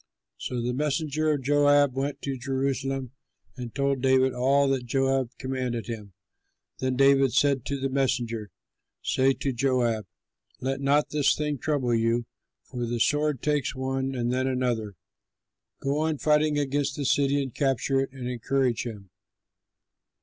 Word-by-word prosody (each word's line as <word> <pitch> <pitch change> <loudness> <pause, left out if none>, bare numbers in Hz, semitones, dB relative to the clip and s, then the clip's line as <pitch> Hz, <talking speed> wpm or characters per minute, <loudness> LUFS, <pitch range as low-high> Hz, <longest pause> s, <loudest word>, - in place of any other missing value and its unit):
'" - - -63
So 120 -2 -4
the 125 +1 -1
messenger 150 +2 0
of 145 -3 -1
Joab 145 0 +4
went 140 +1 -3
to 135 -1 -2
Jerusalem 135 0 -2 0.4
and 125 -3 -6
told 140 -1 0
David 130 0 +3
all 135 +3 +3
that 130 -3 -1
Joab 135 0 +1
commanded 130 -3 -3
him. 105 -4 -7 0.7
Then 130 0 0
David 135 -1 +4
said 140 -4 +2
to 140 -1 -2
the 135 - 0
messenger, 120 -5 -1 0.5
"Say 135 +1 +2
to 135 0 -2
Joab, 120 -5 0 0.5
'Let 135 +1 -2
not 145 +2 +2
this 150 -2 +3
thing 150 -2 -2
trouble 135 -5 0
you, 115 +1 +1 0.4
for 120 -2 -5
the 120 0 -2
sword 150 +1 +1
takes 150 -2 0
one 135 0 -2
and 120 0 -1
then 130 +1 0
another. 120 -6 -1 0.9
Go 140 +2 0
on 155 -1 0
fighting 150 0 +2
against 145 0 0
the 145 - -3
city 140 +1 +2
and 135 -4 -3
capture 135 0 +1
it,' 135 0 -2
and 130 -2 -6
encourage 125 0 0
him." 100 -5 -9
135 Hz, 155 wpm, -26 LUFS, 125-140 Hz, 0.9 s, Joab